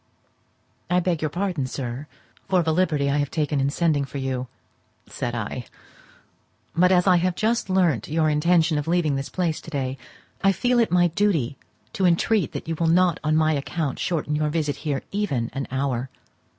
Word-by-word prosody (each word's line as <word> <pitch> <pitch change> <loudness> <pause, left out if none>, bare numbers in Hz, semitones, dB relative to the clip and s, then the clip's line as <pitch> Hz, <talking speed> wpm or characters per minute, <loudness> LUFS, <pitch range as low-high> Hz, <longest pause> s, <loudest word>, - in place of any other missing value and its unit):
"I 180 - +3
beg 175 -3 -1
your 155 - 0
pardon, 175 -5 -2
sir, 130 +2 -5 0.4
for 185 -2 +3
the 160 -1 +1
liberty 155 -5 +1
I 145 - +1
have 145 -1 0
taken 150 -3 0
in 135 - +2
sending 150 -1 +1
for 135 +1 -7
you," 130 -1 -2 0.6
said 120 -1 -4
I; 120 +2 -4 1.1
"but 180 +2 +4
as 180 -1 +4
I 185 -2 +5
have 180 +1 0
just 225 0 0
learnt 170 - +2
your 160 +1 +1
intention 160 +1 +3
of 150 - -5
leaving 165 -4 +2
this 135 0 -3
place 170 -4 -1
to - - -10
day, 135 -3 -3 0.4
I 195 0 +5
feel 245 +6 +2
it 230 - +2
my 175 -1 +4
duty 160 - +1 0.4
to 190 - +2
entreat 190 +4 +2
that - - -6
you 165 - -1
will 165 +1 0
not 175 +1 +3
on 155 0 +2
my 155 0 +3
account 145 0 -2
shorten 155 -3 -1
your 150 0 0
visit 150 -2 -1
here 145 -4 -3
even 140 - -1
an 135 0 -3
hour. 130 -1 -2
155 Hz, 190 wpm, -24 LUFS, 140-180 Hz, 1.1 s, I